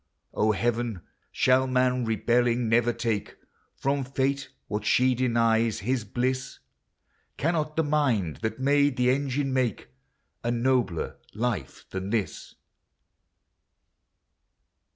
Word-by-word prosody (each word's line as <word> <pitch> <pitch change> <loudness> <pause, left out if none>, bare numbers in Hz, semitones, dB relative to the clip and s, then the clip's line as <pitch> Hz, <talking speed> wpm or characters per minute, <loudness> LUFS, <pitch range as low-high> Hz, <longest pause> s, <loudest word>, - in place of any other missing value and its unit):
O 110 0 +2
Heaven, 115 -2 -1 0.3
shall 130 +1 +3
man 125 -1 +1
rebelling 120 +2 +1
never 120 +1 +3
take 115 -3 -3 0.4
From 140 0 0
Fate 135 +1 -1 0.2
what 105 0 -3
she 130 +4 +3
denies, 115 -3 +2
his 120 +2 -1
bliss? 125 +5 -2 0.8
Cannot 155 -1 0
the 160 - +2
mind 130 - +1
that 110 +3 -3
made 140 0 +3
the 125 0 +3
engine 135 0 -1
make 125 - -1 0.5
A 120 - -1
nobler 120 -6 0 0.2
life 105 - -3
than 95 +1 -4
this? 110 -3 -3
125 Hz, 110 wpm, -27 LUFS, 115-130 Hz, 0.8 s, shall